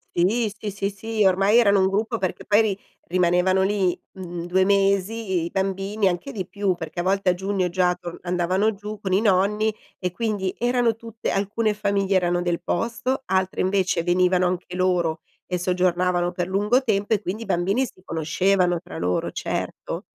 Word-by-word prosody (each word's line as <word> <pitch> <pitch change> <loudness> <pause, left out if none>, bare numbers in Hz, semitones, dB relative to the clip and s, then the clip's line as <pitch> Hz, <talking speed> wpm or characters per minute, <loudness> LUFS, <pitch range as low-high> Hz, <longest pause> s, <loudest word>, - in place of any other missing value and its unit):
Sì, 210 +5 +2
sì, 215 -2 -4
sì, 200 0 -2
sì, 215 +1 -1
ormai 195 +5 +4
erano 200 -3 +4
un 190 - +4
gruppo 220 +4 -1
perché 185 -3 -3
poi 210 +1 +4
ri 200 -2 -1 0.3
rimanevano 180 +1 +3
lì, 190 -2 +1
mhmm, 175 -3 -6
2 185 +1 +3
mesi 200 0 +2
i 190 -7 -2
i - - -4
bambini 195 +2 0
anche 185 +10 -2
di 190 -5 -5
più, 200 -2 0
perché 175 - -7
a - - 0
volte 195 0 +1
a - - +4
giugno 190 0 -1
già 180 0 +2
torn 175 -1 -7
andavano 180 +4 +1
giù 210 +1 -7
con 190 -3 -2
i 195 - +3
nonni 210 +2 +2 0.3
e 180 -2 -2
quindi 205 -3 -2
erano 240 -2 +2
tutte 230 -1 -6
alcune 210 +2 0
famiglie 200 -2 0
erano 175 -1 +2
del 175 -1 -1
posto, 235 +9 -2
altre 190 0 0
invece 185 -2 +1
venivano 180 +1 +2
anche 180 0 -4
loro 175 -3 +1 0.2
e 180 -1 -2
soggiornavano 180 0 +1
per 175 -1 -3
lungo 210 +7 +2
tempo 210 -3 0
e 210 - +1
quindi 210 +4 -4
i - - -9
bambini 195 +9 +1
si 185 - -13
conoscevano 175 +2 +1
tra 175 - -9
loro, 90 +1 -1
certo. - - -4
190 Hz, 185 wpm, -23 LUFS, 180-210 Hz, 0.3 s, ormai